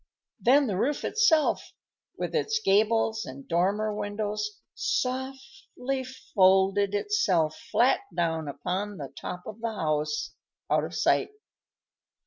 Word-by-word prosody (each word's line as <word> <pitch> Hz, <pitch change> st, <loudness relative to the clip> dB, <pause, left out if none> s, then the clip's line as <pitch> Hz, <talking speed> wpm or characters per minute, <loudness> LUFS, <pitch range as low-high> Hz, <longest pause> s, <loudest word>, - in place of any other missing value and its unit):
Then 275 Hz, +4 st, +5 dB
the 200 Hz, -7 st, -1 dB
roof 285 Hz, +6 st, 0 dB
itself, 350 Hz, -9 st, +2 dB, 0.4 s
with -, -, -3 dB
its 440 Hz, 0 st, +1 dB
gables 220 Hz, -, +2 dB
and 135 Hz, +1 st, -9 dB
dormer 200 Hz, +5 st, +1 dB
windows, 210 Hz, 0 st, -3 dB, 0.2 s
softly 265 Hz, +1 st, -3 dB, 0.3 s
folded 195 Hz, +1 st, +4 dB
itself 205 Hz, -, +1 dB, 0.2 s
flat 245 Hz, +3 st, +4 dB
down 160 Hz, -3 st, -1 dB
upon 190 Hz, +7 st, -3 dB
the 140 Hz, -3 st, -7 dB
top 180 Hz, +4 st, -6 dB
of 220 Hz, +1 st, -9 dB
the 230 Hz, -1 st, -1 dB
house, 150 Hz, -4 st, -1 dB, 0.4 s
out -, -, +3 dB
of -, -, -7 dB
sight. -, -, +2 dB
210 Hz, 115 wpm, -27 LUFS, 180-255 Hz, 0.4 s, Then